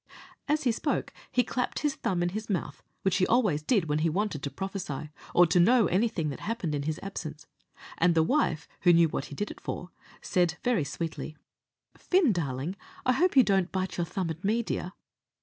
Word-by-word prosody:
As 305 Hz, +1 st, +1 dB
he 250 Hz, -, +3 dB
spoke, 225 Hz, -, -2 dB, 0.2 s
he 250 Hz, -, +3 dB
clapped 250 Hz, 0 st, -2 dB
his 295 Hz, -2 st, +1 dB
thumb 175 Hz, -8 st, -1 dB
in 175 Hz, -, +1 dB
his 215 Hz, +4 st, -5 dB
mouth, 170 Hz, -7 st, -2 dB, 0.2 s
which 190 Hz, -1 st, +2 dB
he 185 Hz, -, +2 dB
always 210 Hz, -11 st, +2 dB
did 195 Hz, +2 st, +2 dB
when 150 Hz, -1 st, 0 dB
he 165 Hz, +1 st, +2 dB
wanted 190 Hz, -3 st, -1 dB
to 140 Hz, -, -3 dB
prophesy, 165 Hz, -2 st, -5 dB, 0.2 s
or 175 Hz, -, +8 dB
to 175 Hz, +2 st, +3 dB
know 230 Hz, +5 st, +5 dB
anything 185 Hz, -4 st, +1 dB
that 140 Hz, -, -6 dB
happened 210 Hz, -8 st, -3 dB
in 145 Hz, -, -1 dB
his 155 Hz, +2 st, -2 dB
absence; 155 Hz, -6 st, -6 dB, 0.5 s
and 170 Hz, 0 st, +4 dB
the 160 Hz, -, +5 dB
wife, 165 Hz, -, +1 dB
who 175 Hz, -1 st, +6 dB
knew 165 Hz, -1 st, +5 dB
what 140 Hz, -, -3 dB
he 145 Hz, -, -9 dB
did 205 Hz, +7 st, -3 dB
it -, -, -12 dB
for, 180 Hz, -, -5 dB, 0.3 s
said, 175 Hz, -1 st, +1 dB
very 240 Hz, -10 st, +2 dB
sweetly, 155 Hz, +1 st, -5 dB, 0.6 s
"Fin, 360 Hz, -, +3 dB
darling, 145 Hz, +1 st, -2 dB, 0.3 s
I 255 Hz, -, +4 dB
hope 345 Hz, +3 st, +2 dB
you 260 Hz, -, +9 dB
don't 195 Hz, -4 st, +2 dB
bite 190 Hz, 0 st, -2 dB
your 175 Hz, -, 0 dB
thumb 180 Hz, -1 st, -2 dB
at 160 Hz, +2 st, -8 dB
me, 220 Hz, +4 st, +1 dB
dear?" 185 Hz, -4 st, -3 dB
180 Hz, 205 wpm, -28 LUFS, 160-215 Hz, 0.6 s, you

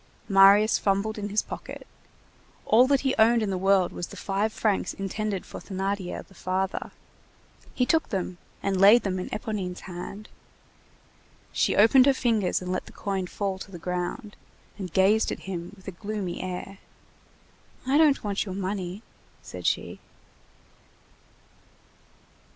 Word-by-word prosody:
Marius 200 Hz, +2 st, +6 dB
fumbled 205 Hz, +2 st, 0 dB
in 205 Hz, 0 st, -4 dB
his 210 Hz, +1 st, +1 dB
pocket. -, -, -8 dB, 0.8 s
All 245 Hz, +4 st, +5 dB
that 275 Hz, -1 st, +3 dB
he 270 Hz, -1 st, +1 dB
owned 230 Hz, +1 st, +5 dB
in 200 Hz, -, -1 dB
the -, -, -1 dB
world 195 Hz, -1 st, +3 dB
was 175 Hz, -, -5 dB
the -, -, -11 dB
five 200 Hz, +2 st, -1 dB
francs 215 Hz, -2 st, -1 dB
intended 195 Hz, 0 st, -3 dB
for -, -, -8 dB
Thénardier 195 Hz, -1 st, -4 dB
the -, -, -20 dB
father. 185 Hz, +1 st, -2 dB, 0.9 s
He 250 Hz, -, +2 dB
took 320 Hz, +5 st, +1 dB
them 185 Hz, -3 st, -3 dB, 0.2 s
and 195 Hz, -1 st, 0 dB
laid 210 Hz, +5 st, +8 dB
them 185 Hz, -2 st, -2 dB
in 180 Hz, -, -5 dB
Éponine's 200 Hz, -4 st, -4 dB
hand. 190 Hz, +4 st, -8 dB, 1.2 s
She -, -, +1 dB
opened 250 Hz, +5 st, +6 dB
her 275 Hz, -, +4 dB
fingers 220 Hz, -8 st, +1 dB
and 180 Hz, -, -4 dB
let 185 Hz, -, -3 dB
the -, -, -11 dB
coin 195 Hz, -3 st, -3 dB
fall 195 Hz, 0 st, -3 dB
to 195 Hz, -, -9 dB
the 185 Hz, -, -9 dB
ground, 180 Hz, +5 st, -4 dB, 0.4 s
and 190 Hz, -4 st, -6 dB
gazed 195 Hz, +5 st, +3 dB
at -, -, -5 dB
him 175 Hz, -1 st, -6 dB
with 190 Hz, -, -19 dB
a -, -, -3 dB
gloomy 195 Hz, 0 st, -5 dB
air. 185 Hz, +1 st, -6 dB, 1.1 s
"I 275 Hz, +3 st, +3 dB
don't 300 Hz, -3 st, +4 dB
want 200 Hz, -2 st, -1 dB
your 190 Hz, -3 st, -6 dB
money," 190 Hz, +1 st, -4 dB, 0.4 s
said -, -, -5 dB
she. -, -, -1 dB
195 Hz, 150 wpm, -26 LUFS, 185-215 Hz, 1.2 s, laid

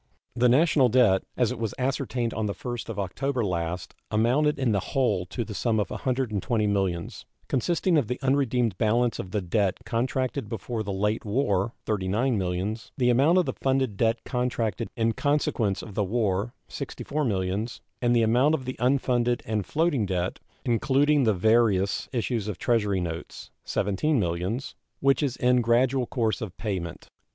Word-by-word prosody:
The 125 Hz, 0 st, +4 dB
national 140 Hz, -1 st, +4 dB
debt, 110 Hz, -6 st, +4 dB, 0.2 s
as 125 Hz, -1 st, +2 dB
it 125 Hz, -, -5 dB
was 110 Hz, -3 st, -3 dB
ascertained 130 Hz, -3 st, -1 dB
on 110 Hz, -1 st, -1 dB
the 100 Hz, -, -3 dB
1st 120 Hz, -2 st, -5 dB
of 110 Hz, -, -5 dB
October 120 Hz, +6 st, -1 dB
last, 85 Hz, -2 st, -3 dB, 0.2 s
amounted 125 Hz, +8 st, +2 dB
in 130 Hz, -4 st, +1 dB
the 100 Hz, -, +2 dB
whole 105 Hz, -6 st, 0 dB
to 120 Hz, +4 st, -4 dB
the 105 Hz, -, -7 dB
sum 110 Hz, +1 st, 0 dB
of 100 Hz, -, -1 dB
$120 115 Hz, -4 st, -1 dB
millions, 95 Hz, -4 st, -2 dB, 0.2 s
consisting 165 Hz, +5 st, +2 dB
of 120 Hz, -, -2 dB
the 125 Hz, +2 st, -3 dB
unredeemed 125 Hz, -6 st, +1 dB
balance 115 Hz, +1 st, +2 dB
of 95 Hz, -, -5 dB
the 105 Hz, +2 st, -1 dB
debt 95 Hz, +1 st, 0 dB
contracted 130 Hz, +1 st, -1 dB
before 115 Hz, +1 st, -4 dB
the 100 Hz, -2 st, -4 dB
late 105 Hz, +3 st, 0 dB
war 105 Hz, -2 st, 0 dB
($39 110 Hz, +5 st, 0 dB
millions), 95 Hz, +4 st, -2 dB
the 125 Hz, -2 st, +3 dB
amount 140 Hz, +9 st, +4 dB
of 180 Hz, -, +4 dB
the -, -, -2 dB
funded 130 Hz, -5 st, 0 dB
debt 115 Hz, +2 st, +1 dB
contracted 125 Hz, -5 st, -1 dB
in 115 Hz, 0 st, +2 dB
consequence 125 Hz, -8 st, 0 dB
of 105 Hz, -, -9 dB
the 105 Hz, -, 0 dB
war 105 Hz, +1 st, -1 dB
($64 150 Hz, -1 st, -3 dB
millions), 100 Hz, +3 st, -2 dB, 0.2 s
and 120 Hz, -1 st, +3 dB
the 115 Hz, -, +4 dB
amount 125 Hz, +8 st, +4 dB
of 130 Hz, -4 st, -6 dB
the 130 Hz, -, -5 dB
unfunded 125 Hz, -1 st, +1 dB
and 105 Hz, -5 st, -2 dB
floating 150 Hz, -, +1 dB
debt, 90 Hz, -1 st, -2 dB, 0.3 s
including 135 Hz, +4 st, +3 dB
the 110 Hz, -, +4 dB
various 105 Hz, -1 st, +2 dB
issues 115 Hz, -4 st, -1 dB
of 105 Hz, -4 st, -4 dB
Treasury 105 Hz, -5 st, +1 dB
notes, 85 Hz, -1 st, -6 dB, 0.2 s
$17 105 Hz, +10 st, +1 dB
millions, 95 Hz, +6 st, -2 dB, 0.3 s
which 135 Hz, 0 st, +3 dB
is 135 Hz, -4 st, -1 dB
in 125 Hz, 0 st, +3 dB
gradual 125 Hz, +2 st, +2 dB
course 115 Hz, -4 st, -1 dB
of 100 Hz, -5 st, -6 dB
payment. 95 Hz, -6 st, -4 dB
115 Hz, 170 wpm, -26 LUFS, 100-130 Hz, 0.3 s, The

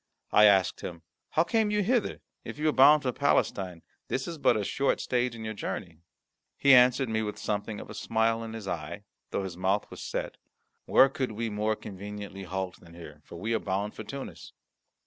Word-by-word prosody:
I 105 Hz, -, +7 dB
asked 95 Hz, -3 st, +4 dB
him, 85 Hz, -1 st, -7 dB, 0.3 s
"How 160 Hz, -, +3 dB
came 220 Hz, +4 st, +1 dB
you 210 Hz, 0 st, +1 dB
hither? 240 Hz, +2 st, 0 dB, 0.2 s
If -, -, -7 dB
you 155 Hz, +1 st, 0 dB
are -, -, 0 dB
bound 145 Hz, +3 st, +7 dB
for 130 Hz, -, 0 dB
Palestine, 100 Hz, -, 0 dB, 0.2 s
this 130 Hz, -, -2 dB
is 165 Hz, -2 st, -6 dB
but 120 Hz, -, +4 dB
a 105 Hz, -, -1 dB
short 135 Hz, +7 st, 0 dB
stage 125 Hz, -1 st, 0 dB
in 110 Hz, -1 st, -7 dB
your 110 Hz, -, -3 dB
journey." 85 Hz, -5 st, -5 dB, 0.6 s
He 140 Hz, -1 st, +6 dB
answered 125 Hz, +1 st, +6 dB
me 110 Hz, 0 st, 0 dB
with 105 Hz, -1 st, -4 dB
something 105 Hz, 0 st, -3 dB
of -, -, -9 dB
a -, -, -9 dB
smile 115 Hz, 0 st, 0 dB
in 110 Hz, 0 st, -7 dB
his 110 Hz, -3 st, -7 dB
eye, 85 Hz, +3 st, -5 dB, 0.3 s
though 100 Hz, -, -2 dB
his 90 Hz, -3 st, -6 dB
mouth 95 Hz, +3 st, 0 dB
was -, -, -9 dB
set, -, -, -4 dB, 0.5 s
"Where 135 Hz, -, +6 dB
could 130 Hz, -4 st, -3 dB
we 115 Hz, +1 st, -3 dB
more 105 Hz, +1 st, 0 dB
conveniently 100 Hz, -1 st, -8 dB
halt 95 Hz, 0 st, -4 dB
than 85 Hz, -1 st, -16 dB
here, 75 Hz, -3 st, -11 dB
for -, -, -11 dB
we 110 Hz, +7 st, -2 dB
are -, -, +2 dB
bound 100 Hz, +2 st, -2 dB
for -, -, -7 dB
Tunis?" 135 Hz, +5 st, -8 dB
110 Hz, 205 wpm, -28 LUFS, 95-130 Hz, 0.6 s, I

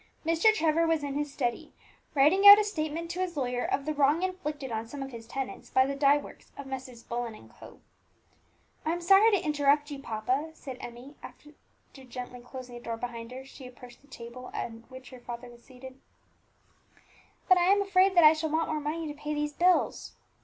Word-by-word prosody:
Mr. 330 Hz, +7 st, +4 dB
Trevor 330 Hz, -4 st, +1 dB
was 325 Hz, -2 st, +1 dB
in 285 Hz, -1 st, -3 dB
his 295 Hz, 0 st, -3 dB
study, 245 Hz, -4 st, -3 dB, 0.4 s
writing 330 Hz, +9 st, +5 dB
out 405 Hz, 0 st, +13 dB
a 425 Hz, -, +2 dB
statement 335 Hz, -4 st, -4 dB
to 360 Hz, -, -6 dB
his 360 Hz, -3 st, -3 dB
lawyer 245 Hz, -2 st, -1 dB
of 275 Hz, -, -1 dB
the 310 Hz, -, -1 dB
wrong 295 Hz, +4 st, +2 dB
inflicted 300 Hz, -8 st, -4 dB
on 225 Hz, 0 st, -3 dB
some 275 Hz, +3 st, -6 dB
of 270 Hz, -, -8 dB
his 230 Hz, -2 st, -10 dB
tenants 270 Hz, +2 st, -6 dB
by 260 Hz, -, +4 dB
the 275 Hz, -, -2 dB
dye 280 Hz, +1 st, +4 dB
works 290 Hz, -, -11 dB
of 280 Hz, -, -7 dB
Messrs. 260 Hz, -3 st, -8 dB
Bullen 235 Hz, -1 st, -4 dB
and -, -, -16 dB
Co. -, -, -15 dB, 1.0 s
"I 320 Hz, -, 0 dB
am 345 Hz, -, -4 dB
sorry 390 Hz, +5 st, +6 dB
to 410 Hz, -, +3 dB
interrupt 295 Hz, 0 st, +2 dB
you, 280 Hz, -, -6 dB
papa," 255 Hz, +5 st, -2 dB
said 260 Hz, -5 st, -9 dB
Emmie, 245 Hz, +4 st, -10 dB
as, -, -, -9 dB
after 300 Hz, +1 st, -19 dB, 0.5 s
gently 250 Hz, 0 st, -8 dB
closing 250 Hz, 0 st, -10 dB
the 240 Hz, -, -9 dB
door 230 Hz, -1 st, -5 dB
behind 230 Hz, -1 st, -6 dB
her, 260 Hz, +1 st, -8 dB
she 270 Hz, -1 st, -12 dB
approached 245 Hz, -1 st, -14 dB
the 285 Hz, -, -24 dB
table 245 Hz, 0 st, -10 dB
at -, -, -3 dB, 0.2 s
which 260 Hz, 0 st, -12 dB
her 255 Hz, -, -11 dB
father 240 Hz, 0 st, -8 dB
was 235 Hz, 0 st, -17 dB
seated, 260 Hz, 0 st, -13 dB, 1.5 s
"but 370 Hz, -2 st, +6 dB
I 350 Hz, -, +3 dB
am 400 Hz, 0 st, +3 dB
afraid 385 Hz, -1 st, +3 dB
that 345 Hz, -, +6 dB
I 305 Hz, 0 st, +9 dB
shall 315 Hz, 0 st, -3 dB
want 320 Hz, +2 st, 0 dB
more 310 Hz, -, -1 dB
money 310 Hz, +2 st, -3 dB
to 295 Hz, -, -5 dB
pay 300 Hz, +1 st, -5 dB
these 295 Hz, 0 st, -2 dB
bills." 360 Hz, +3 st, +1 dB
285 Hz, 210 wpm, -28 LUFS, 250-320 Hz, 1.5 s, out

